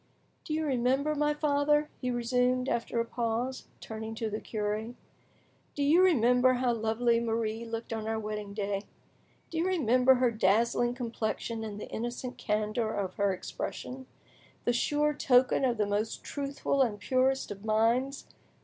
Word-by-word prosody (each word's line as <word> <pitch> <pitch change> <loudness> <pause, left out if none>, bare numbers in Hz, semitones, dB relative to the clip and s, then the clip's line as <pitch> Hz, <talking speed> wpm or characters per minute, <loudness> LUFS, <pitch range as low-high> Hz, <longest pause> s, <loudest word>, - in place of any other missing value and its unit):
Do 310 - -2
you 315 0 -1
remember, 270 +2 +1
my 295 0 +1
father," 295 0 +2
he 250 - -1
resumed, 250 +1 +1
after 235 -1 -1
a 230 - +1
pause, 235 +2 -2
turning 220 0 -6
to 220 -1 -3
the 215 - -3
cure, 215 +2 -3 0.8
"do 285 - 0
you 315 +6 +5
remember 255 -7 +4
how 250 -1 +1
lovely 230 +1 +1
Marie 225 0 -2
looked 230 0 -5
on 220 -1 -4
our 225 0 -1
wedding 210 -2 -5
day? 200 -1 -1 0.7
Do 325 - -2
you 335 - +1
remember 260 -7 +4
her 250 -1 +2
dazzling 230 +3 +2
complexion 230 -2 -3
and 210 -2 -6
the - - -6
innocent 240 +2 -5
candour 215 +1 -1
of 190 -2 -2
her 200 -1 +2
expression?—the 250 +5 -6
sure 295 +5 +1
token 255 -2 +3
of 245 -3 +2
the 210 - +2
most 205 +2 -2
truthful 280 -1 -1
and 220 -5 +1
purest 260 +4 +1
of 200 0 -8
minds! 230 +5 +1
235 Hz, 155 wpm, -30 LUFS, 220-260 Hz, 0.8 s, you